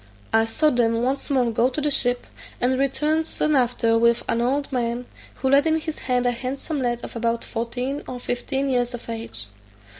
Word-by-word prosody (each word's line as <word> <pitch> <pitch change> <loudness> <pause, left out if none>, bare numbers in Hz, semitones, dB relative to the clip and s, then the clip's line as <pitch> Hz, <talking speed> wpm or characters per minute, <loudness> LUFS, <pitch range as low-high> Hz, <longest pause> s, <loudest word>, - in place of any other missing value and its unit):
I 225 0 +5
saw 300 +7 +2
them 230 -1 +2
once 270 +4 -1
more 255 -4 +2
go 235 +3 +3
to 265 - -4
the 295 0 0
ship, 245 -2 +1 0.3
and 255 +1 +1
return 300 +4 +1
soon 305 -1 0
after 235 -3 +2
with 235 0 +3
an 230 - +1
old 275 +4 0
man, 240 -1 -1 0.3
who 265 - -1
led 280 +3 +5
in 320 0 +2
his 315 0 -5
hand 250 -1 0
a 245 - +3
handsome 265 +4 -3
lad 240 -1 -1
of - - -7
about 230 0 0
fourteen 245 +5 -3
or 250 - -5
fifteen 265 +3 -2
years 245 -1 +1
of 240 - -11
age. 225 - -1
250 Hz, 200 wpm, -23 LUFS, 235-275 Hz, 0.3 s, I